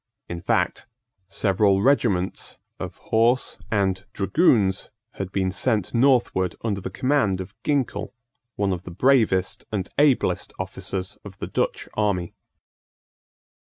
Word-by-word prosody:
In 85 -1 -5
fact, - - 0 0.4
several 100 0 +2
regiments 105 -9 +1 0.2
of - - -6 0.2
horse 120 +3 +3
and 95 -3 +1
dragoons 100 - +2 0.3
had 95 -1 -3
been 95 -1 0
sent 105 -1 0
northward 120 -7 +3
under 100 -4 -1
the 95 - -4
command 115 -3 +1
of 95 +2 -7
Ginkell, 125 -8 -1 0.4
one 100 -2 +1
of 90 - -4
the 90 - -9
bravest 105 -3 +2
and 100 -4 -2
ablest 145 -3 +2
officers 95 -1 -5
of - - -11
the - - -4
Dutch - - -2
army. 100 -5 0
100 Hz, 120 wpm, -24 LUFS, 95-120 Hz, 0.4 s, horse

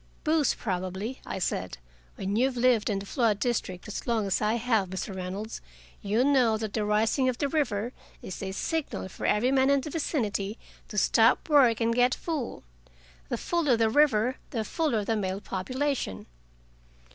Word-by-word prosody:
"Booze, 310 -3 +2
probably," 190 +4 -4
I - - -3
said. 95 - -2 0.4
"When 195 +1 -3
you've 255 +2 +1
lived 240 -3 +3
in 205 - 0
the 195 - -5
flood 220 -2 +1
district 205 -7 -2
as 210 - -6
long 225 -3 +1
as 195 - 0
I 215 +1 +2
have, 225 -5 +1
Mr. 190 +1 -4
Reynolds, 190 +4 -5 0.4
you'll 215 +5 +1
know 255 -6 +4
that 215 -1 -4
the 215 - 0
rising 220 +5 +2
of 250 - -2
the 285 - 0
river 250 -6 -1 0.3
is 185 - -7
a 190 -1 -3
signal 295 - -3
for - - -4
every 240 +5 +3
man 265 0 +4
in 280 -1 +4
the 300 - -6
vicinity 220 -9 -1 0.3
to 210 - -8
stop 225 +4 +4
work 260 -7 +5
and 230 0 +2
get 245 +1 +3
full. 310 -8 -4 0.7
The - - -1
fuller 310 -8 +1
the 225 -1 +2
river, 255 -3 +3
the 225 -3 -2
fuller 240 -10 0
the 225 - 0
male 190 -2 -2
population." 245 - -3
225 Hz, 175 wpm, -28 LUFS, 200-260 Hz, 0.7 s, work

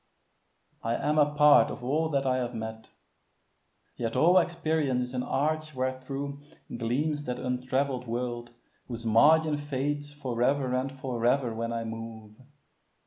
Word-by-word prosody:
I 115 +1 -1
am 150 +4 +1
a 145 0 +4
part 150 -1 +6
of - - -7
all 155 +5 0
that 140 -2 0
I 130 -1 +2
have 120 -1 -3
met; 110 0 -6 1.1
Yet 115 -1 -3
all 180 +3 +6
experience 155 -7 0
is 125 +1 -7
an 125 - -1
arch 155 +3 -1
wherethro' 130 +2 -3 0.4
Gleams 145 +6 -1
that 125 0 -3
untravell'd 125 +1 -1
world 120 0 -3 0.4
whose 115 -2 -6
margin 150 +7 +5
fades 145 0 -3
For 130 -5 -4
ever 130 0 +2
and 130 +1 -1
for 130 -4 -5
ever 125 -1 +2
when 115 +1 -3
I 115 0 -2
move. 110 -1 -7
130 Hz, 145 wpm, -28 LUFS, 120-145 Hz, 1.1 s, part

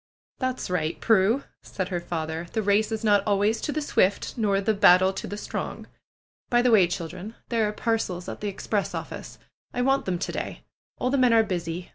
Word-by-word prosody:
That's 255 -7 -2
right, 160 -3 -1
Prue," 225 +4 +3 0.2
said 185 -1 -4
her 180 -2 -1
father, 165 -1 -4
^Hhe 220 -2 -1
race 210 +2 +2
is 220 0 -3
not 205 -2 +4
always 205 +2 +2
to - - -2
the 305 0 -2
swift, 200 -8 +1
nor 205 -4 +1
the 200 +2 +1
battle 190 -1 +5
to 190 - -5
the 205 - -5
strong. - - -5 0.6
By 240 -1 +3
the 250 - +4
way, 195 -6 +6
children, 175 +5 -6
there 225 -3 +1
are - - -1
parcels 210 -5 -2
at - - -6
the 210 - -2
express 200 +1 -2
office. - - -7 0.4
I 245 - +1
want 270 +1 +2
them 185 -2 -1
to - - -3
day. - - -5 0.3
All 250 - -1
the 280 - +2
men 250 -2 +5
are 225 - +6
busy. 175 -3 -4
205 Hz, 205 wpm, -26 LUFS, 180-225 Hz, 0.6 s, way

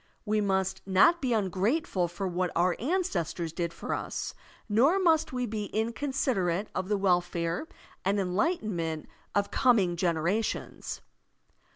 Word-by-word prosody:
We 215 0 +1
must 190 -1 0
not 210 - +5
be 260 - 0
tmgrate 215 - +1
ful 180 -2 0
for 175 +3 -4
what 180 0 0
our 175 +1 +3
ancestors 200 - -1
did 170 -1 -2
for 170 - -4
us, - - -3 0.3
nor 250 - +4
must 330 -5 +3
we 250 -1 -1
be 215 -2 -3
inconsiderate 220 -5 -1
of 185 - -3
the 210 - +2
welfare 175 - 0 0.4
and 200 +2 +1
enlighten 210 - 0
ment 160 -2 -3 0.3
of 200 0 +1
coming 205 -9 +3
generations. 170 +5 -1
195 Hz, 140 wpm, -29 LUFS, 175-235 Hz, 0.4 s, not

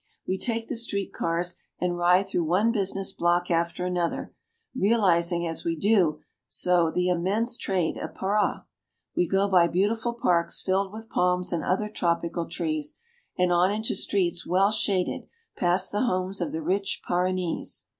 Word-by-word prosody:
We 190 0 -1
take 230 -1 -1
the - - -3
street 205 -4 -1
cars 170 +1 -2 0.2
and 180 -1 0
ride 180 +2 +3
through 175 -3 -1
one 190 +8 +2
business 195 -3 0
block 175 +1 +1
after 170 +1 0
another, 175 -2 -2 0.4
realizing 180 -7 +2
as 165 -1 -2
we 165 -1 -1
do 180 -4 +2 0.3
so 175 -2 +2
the 180 +2 0
immense 200 +7 0
trade 185 -7 -1
of - - -6
Para. 205 +2 0 0.5
We 175 - +2
go 195 +2 +2
by 180 -3 +5
beautiful 220 +7 0
parks, 170 -7 +1
filled 190 0 0
with 220 +1 -10
palms 180 0 +1
and 165 -3 -1
other 195 +4 0
tropical 170 -3 -1
trees, 310 -1 -3 0.4
and 180 -1 +2
on 180 +2 +3
into 215 +2 -1
streets 175 -4 0
well 195 +3 +2
shaded, 200 -4 0 0.3
past 175 +1 +1
the 205 - 0
homes 185 -5 -1
of 170 - -2
the 160 0 -4
rich 195 +4 -1
Paranese. 180 -1 -1
185 Hz, 160 wpm, -26 LUFS, 175-205 Hz, 0.5 s, by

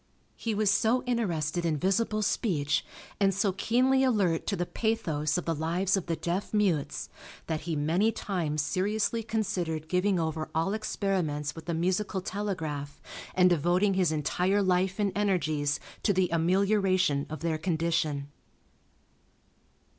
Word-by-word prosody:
He 225 -2 -2
was 210 -1 +3
so 225 +4 +2
interested 175 - -1
in 160 -3 +1
visible 215 +5 +1
speech, 160 - 0 0.4
and 195 -2 +3
so 195 0 +2
keenly 255 +7 +2
alert 200 -10 +1
to - - 0
the 175 - -1
pathos 160 -9 -1
of 180 - -3
the 165 - 0
lives 170 +5 0
of 190 -4 -3
the 165 - 0
deaf 180 +6 -3
mutes, 185 -9 0 0.4
that 160 -2 -2
he 160 - 0
many 165 +9 +2
times 165 -8 -2
seriously 210 +8 0
considered 185 -8 -2
giving 185 +2 +1
over 160 -1 -2
all 165 +5 +1
experiments 180 -9 -1
with 165 - -10
the 170 - -2
musical 190 +4 0
telegraph 160 -8 -4 0.4
and 180 -1 +5
devoting 175 +5 +2
his 185 -4 +2
entire 180 +6 +1
life 185 0 +1
and 205 -2 +1
energies 155 -8 0 0.2
to 205 - +2
the 185 -1 +2
amelioration 185 -3 +2
of 155 - -6
their 165 -2 -1
condition. 160 -3 0
180 Hz, 145 wpm, -29 LUFS, 160-205 Hz, 0.4 s, and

